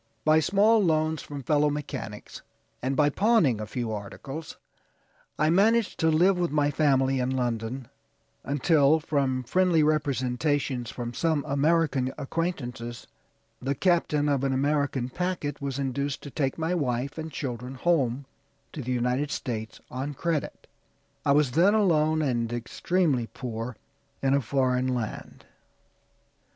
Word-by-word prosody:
By 155 0 +5
small 205 +7 +4
loans 155 -2 +1
from 140 -2 -7
fellow 150 +2 +3
mechanics, 145 -7 -6 0.4
and 130 +2 -1
by 145 +1 +3
pawning 180 - +3
a 105 - -5
few 120 -1 -3
articles, 135 +9 -7 0.8
I 155 +1 +3
managed 220 +5 +3
to 160 - +3
live 180 +4 +4
with 175 -1 +1
my 145 0 +1
family 135 -3 +2
in 125 0 0
London, 120 -1 -2 0.6
until, 145 +1 +3
from 135 -4 0
friendly 170 +4 +3
representations 140 -3 0
from 120 -1 -5
some 155 +2 0
American 145 -2 +2
acquaintances, 130 -6 -4 0.6
the 135 +2 -1
captain 155 -3 +2
of 140 -2 +1
an 135 -1 +1
American 140 -2 0
packet 165 -2 -3
was 140 -2 -3
induced 140 0 -2
to 145 - -8
take 135 -3 -1
my 165 +2 -1
wife 135 -2 -1
and 160 0 -5
children 125 -2 -5
home 135 -4 +1 0.5
to 150 - -5
the 125 0 -4
United 125 +3 0
States 110 -6 -4
on 135 +3 -4
credit. 165 0 -2 0.6
I 140 - +3
was 145 -3 +3
then 185 - +4
alone, 160 -6 +3
and 120 -4 0
extremely 130 +2 0
poor, 115 -1 -6 0.5
in 135 0 +3
a 140 - +3
foreign 130 0 +1
land." 110 -3 -6
140 Hz, 140 wpm, -27 LUFS, 125-160 Hz, 0.8 s, By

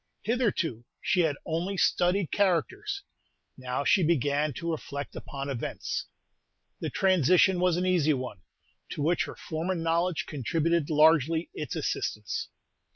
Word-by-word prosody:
Hitherto 205 - 0 0.2
she 190 - +1
had 160 -4 +3
only 175 +4 -2
studied 180 0 +2
characters; 395 - 0 0.5
now 130 +1 -3
she 190 - +4
began 150 -2 +2
to 170 +6 -3
reflect 140 -2 -5
upon 140 -1 -6
events. 135 -4 -3 0.7
The - - -3
transition 185 - +4
was 180 -1 +2
an 180 - 0
easy 165 -5 +3
one, 125 -8 -6 0.5
to 145 - -3
which 170 +3 +2
her - - -8
former 170 +4 -3
knowledge 165 +1 0
contributed 160 +3 0
largely 160 +1 +4
its 150 - -5
assistance. 105 -1 -2
165 Hz, 130 wpm, -28 LUFS, 145-180 Hz, 0.7 s, she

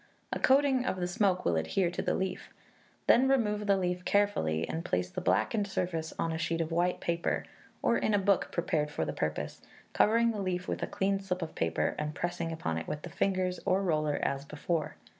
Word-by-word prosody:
A - - -2
coating 270 -1 +4
of 185 - -2
the 175 - 0
smoke 190 -1 +1
will 85 - +2
adhere 170 - +1
to 180 - -3
the - - 0
leaf. 190 0 -3 0.6
Then 255 +3 +5
remove 210 -6 +1
the 200 -1 +4
leaf 180 -1 -1
carefully, 130 - +1
and 165 - -3
place 90 - -1
the - - -4
blackened 215 -5 +1
surface 165 -4 -2
on 165 - 0
a 160 - -3
sheet 165 +1 -1
of 165 0 -1
white 175 +2 +1
paper, 170 0 -1 0.4
or 235 - +3
in 215 - +2
a - - +4
book 200 -1 +2
prepared 155 -3 0
for 80 - -2
the - - -3
purpose, 75 -1 -3 0.3
covering 230 +2 +4
the 210 -3 -3
leaf 180 -1 -2
with - - -2
a - - -1
clean 195 0 0
slip 185 -2 -3
of 160 - -6
paper, 80 -2 0
and 150 0 -3
pressing 175 -1 -2
upon 80 - -2
it - - -7
with 150 - -4
the 175 - -7
fingers, 185 -1 0
or 190 +2 +2
roller, 155 -4 +1
as 140 0 -1
before. 150 +2 -2
180 Hz, 215 wpm, -31 LUFS, 155-200 Hz, 0.6 s, Then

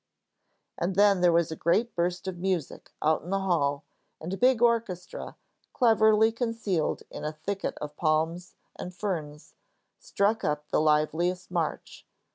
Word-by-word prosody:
And 180 +2 -1
then 200 -2 +4
there 175 -1 +5
was 170 -1 +2
a - - -3
great 215 +10 +1
burst 175 +2 -2
of 180 -2 -4
music 180 -5 -3
out 155 +1 +2
in 175 - -10
the 195 - +1
hall, 145 -7 0 0.4
and 175 +4 -5
a - - -3
big 250 0 +4
orchestra, 230 -7 -1 0.4
cleverly 220 -2 +4
concealed 225 -8 -2
in - - -7
a 150 - -2
thicket 195 +6 -4
of 150 0 -7
palms 160 +2 0 0.2
and 180 0 -8
ferns, 155 -7 -5 0.5
struck 220 - 0
up 150 0 -1
their - - +2
liveliest 160 +4 +1
march. 170 -4 -3
180 Hz, 150 wpm, -27 LUFS, 160-205 Hz, 0.5 s, there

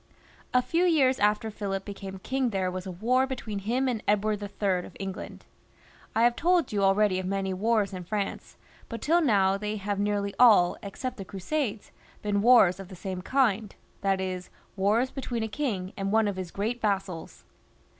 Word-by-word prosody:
A 250 0 +3
few 335 +5 +1
years 280 -7 +3
after 210 +1 +1
Philip 195 -2 -4
became 195 -1 -7
king 260 +6 -1
there 190 -3 -1
was 185 +1 -5
a - - -4
war 250 +8 +1
between 230 -6 -4
him 245 +7 0
and 235 -4 -1
Edward 210 0 +1
III. 200 -2 -1
of - - -15
England. 195 -1 -6 0.7
I 225 - +3
have 240 0 +4
told 345 -3 +2
you 205 - +1
already 195 -1 +3
of 185 - -4
many 195 0 -1
wars 210 +1 +1
in 180 -1 -5
France, 200 +2 -4 0.3
but 230 - -5
till 340 +3 +3
now 195 - +3
they 210 +1 -3
have 200 -1 -3
nearly 205 -1 0
all, 210 -8 +6
except 230 +6 -5
the 195 - -5
Crusades, 215 +4 -3 0.3
been 205 -1 +1
wars 205 -6 +6
of 195 - -8
the 185 - -10
same 185 0 -5
kind; 220 -2 +1 0.3
that 195 -1 +1
is, 185 -1 -4 0.3
wars 215 +6 +2
between 245 -4 -3
a - - -1
king 215 -7 -3
and 195 0 -2
one 220 0 +3
of 200 - -2
his 185 -2 -5
great 225 +7 -3
vassals. 195 -5 -2
205 Hz, 185 wpm, -27 LUFS, 195-235 Hz, 0.7 s, all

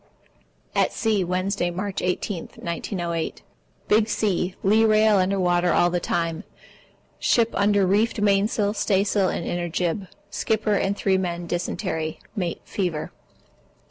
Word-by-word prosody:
At - - +2
sea, 215 -4 +1
Wednesday, 185 0 -1
March 190 +3 -3
18, 180 0 -2
1908. 170 -1 -4 0.4
Big 215 +1 +3
sea. 185 -4 0
Lee 215 +3 +4
rail 215 -1 +5
under 190 +1 +1
water 175 -1 +2
all 175 +1 +3
the 175 - +1
time. 165 +1 -2 0.8
Ship 230 -1 +3
under 200 0 +3
reefed 210 +4 +2
mainsail, 205 +1 +2
staysail, 200 -2 +1
and 170 - -3
inner 175 0 -2
jib. 180 +3 -1 0.2
Skipper 220 -1 0
and 200 0 0
3 190 -1 +2
men 175 -2 -3
dysentery. 165 -2 -3 0.2
Mate 180 -5 -2
fever. 175 -6 -3
190 Hz, 130 wpm, -24 LUFS, 175-205 Hz, 0.8 s, rail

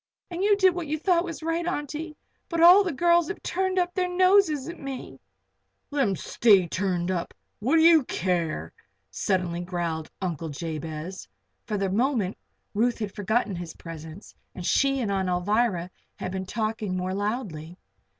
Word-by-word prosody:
And 345 +1 -4
you 410 0 +4
did 380 -2 +5
what 345 -3 -4
you 305 +2 -1
thought 345 +1 +2
was 335 -3 -7
right, 330 +1 0
Auntie. 305 -2 -4 0.3
But 335 - -2
all 355 +4 +9
the 365 - -1
girls 340 +3 +3
have 390 - -6
turned 375 +1 -1
up 355 -1 +1
their 365 -1 0
noses 365 -6 +3
at 340 - -7
me 270 -2 -7 0.4
" - - -50
"Let 285 -1 0
'em 195 - 0
stay 195 0 +3
turned 180 0 -1
up 175 -2 -3 0.2
what 255 +9 +1
do 320 - +5
you 330 -3 +7
care?" 170 - -2 0.4
suddenly 180 -3 -1
growled 170 -3 -3
Uncle 165 -4 -3
Jabez. 160 +3 -6 0.4
For 215 -2 -1
the 195 -1 -1
moment 225 -3 +1 0.4
Ruth 235 +3 +1
had 210 -3 -4
forgotten 215 0 0
his 170 -2 -7
presence 160 +2 -10 0.2
and 180 - -6
she 275 +5 +2
and 215 -4 -1
Aunt 190 -1 0
Alvirah 180 0 0 0.2
had 185 - -5
been 190 0 -4
talking 215 -3 -2
more 185 +1 -2
loudly. 195 -6 -3
215 Hz, 170 wpm, -26 LUFS, -, 0.4 s, all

